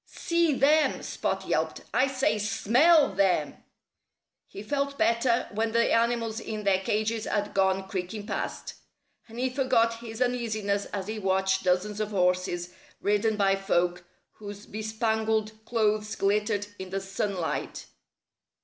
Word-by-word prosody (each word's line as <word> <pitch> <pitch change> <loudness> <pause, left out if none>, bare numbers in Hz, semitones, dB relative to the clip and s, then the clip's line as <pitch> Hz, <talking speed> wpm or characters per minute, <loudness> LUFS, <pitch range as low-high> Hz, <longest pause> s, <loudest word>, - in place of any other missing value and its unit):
"See 335 -2 +1
them!" 300 +3 +3
Spot - - -3
yelped. - - -1
"I 260 - +3
say, 260 -5 0
smell 255 +10 +4
them!" 185 -6 +1 0.9
He 200 - -9
felt 280 +3 -2
better 235 +1 +2
when 220 +1 -1
the 235 0 +3
animals 230 -1 +1
in 215 -2 -5
their 195 -2 +3
cages 215 +3 -1
had 205 0 -2
gone 190 0 +1
creaking 195 +2 -4
past. - - -4 0.5
And 225 0 -12
he 255 +1 0
forgot 250 -4 +2
his 225 -1 -8
uneasiness 220 -5 -1
as 195 -2 -5
he 215 +1 -4
watched 190 -1 +1
dozens 190 +3 0
of 215 -1 -1
horses, 180 -2 0 0.3
ridden 210 +2 +1
by 195 -1 +3
folk 180 -2 0 0.3
whose 205 0 -10
bespangled 220 0 -1
clothes 215 -1 0
glittered 205 +1 +1
in 190 0 -6
the 195 +1 -2
sunlight. 195 -2 -3
215 Hz, 135 wpm, -27 LUFS, 195-230 Hz, 0.9 s, smell